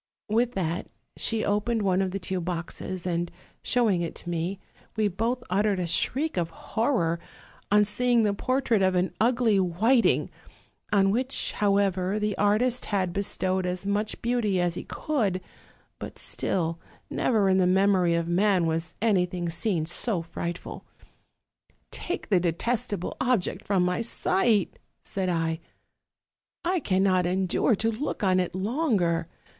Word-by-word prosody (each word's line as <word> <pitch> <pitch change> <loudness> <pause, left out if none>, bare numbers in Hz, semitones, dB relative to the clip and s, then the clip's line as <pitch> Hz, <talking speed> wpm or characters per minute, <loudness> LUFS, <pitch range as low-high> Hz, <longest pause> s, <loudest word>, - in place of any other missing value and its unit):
With 235 +3 +2
that 170 -2 -2 0.3
she 225 -1 -1
opened 210 +2 0
one 190 -1 +2
of 190 - 0
the 190 - -3
two 185 -1 -2
boxes, 175 +1 -4
and 175 -1 -1 0.3
showing 220 -7 +2
it 170 - -4
to 175 - -5
me, 175 +3 -2 0.4
we 215 -1 +2
both 230 +6 -1
uttered 200 +1 +1
a 180 - -1
shriek 275 - 0
of 170 -2 0
horror 170 - -1 0.5
on 210 0 +5
seeing 240 +3 +2
the 205 -1 +2
portrait 250 -1 +1
of 185 -1 +3
an 180 +1 +1
ugly 230 -3 +3
Whit 215 +8 +3
ing, - - +1 0.6
on 195 -1 +4
which, 255 +5 +1
however, 195 -1 +1
the 210 -1 -1
artist 230 +5 +2
had 185 -4 -1
bestowed 190 -2 -1
as 180 +1 -4
much 205 +1 -1
beauty 230 -5 +1
as 175 -1 +1
he - - -6
could; 220 - -1 0.6
but - - -7
still, 165 -2 -2 0.3
never 215 -5 +2
in 190 0 +4
the 180 - +4
memory 185 -2 +3
of 170 0 -1
man 185 0 +3
was 165 0 -2
anything 180 -5 +1
seen 170 -2 0
so 175 +2 -1
frightful. 170 +1 -6 1.1
'Take 350 - -4
the 190 -4 +4
detest 220 +8 -1
able 195 -3 -3
object 250 -7 0
from 195 -3 +2
my 180 +5 0
sight,' 215 -2 +1 0.2
said 190 -2 -2
I, 165 -2 0 1.1
'I 360 +1 +2
cannot 185 - +2
endure 190 +5 +2
to 225 +3 0
look 245 +1 -4
on 185 -1 +3
it 180 0 -2
longer. 190 - 0
195 Hz, 150 wpm, -27 LUFS, 180-220 Hz, 1.1 s, on